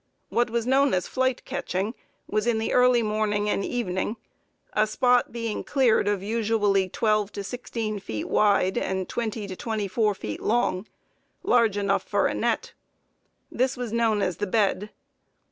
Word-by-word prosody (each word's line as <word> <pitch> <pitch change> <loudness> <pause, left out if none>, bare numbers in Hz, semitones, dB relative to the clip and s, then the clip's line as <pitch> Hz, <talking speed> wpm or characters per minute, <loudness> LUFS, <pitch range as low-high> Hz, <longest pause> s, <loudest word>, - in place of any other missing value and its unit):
What 240 0 +1
was 230 0 -1
known 270 -1 +3
as 180 - -1
flight 260 -1 -1
catching 225 -6 -2 0.3
was 215 +2 -1
in 235 -2 +2
the 220 - -1
early 250 -1 +5
morning 210 -1 0
and 200 - 0
evening, 210 -2 -2 0.6
a 215 +1 +3
spot 245 +3 +2
being 230 -2 -3
cleared 250 -7 +2
of 205 -2 0
usually 205 -3 +1
twelve 215 0 +1
to 200 - -5
sixteen 225 -2 -4
feet 110 - -5
wide 200 -3 +3
and 190 -1 -2
twenty 220 -2 -3
to 190 -2 -6
twenty 215 0 -3
four 210 +2 +1
feet 105 - -6
long, 220 -4 0 0.6
large 230 -4 +3
enough 200 -1 +1
for - - 0
a - - +1
net. 485 -1 -1 0.8
This 255 +1 0
was 245 -3 -4
known 225 -3 +2
as 180 - -1
the 205 - -2
bed. 205 0 +1
215 Hz, 160 wpm, -25 LUFS, 200-240 Hz, 0.8 s, early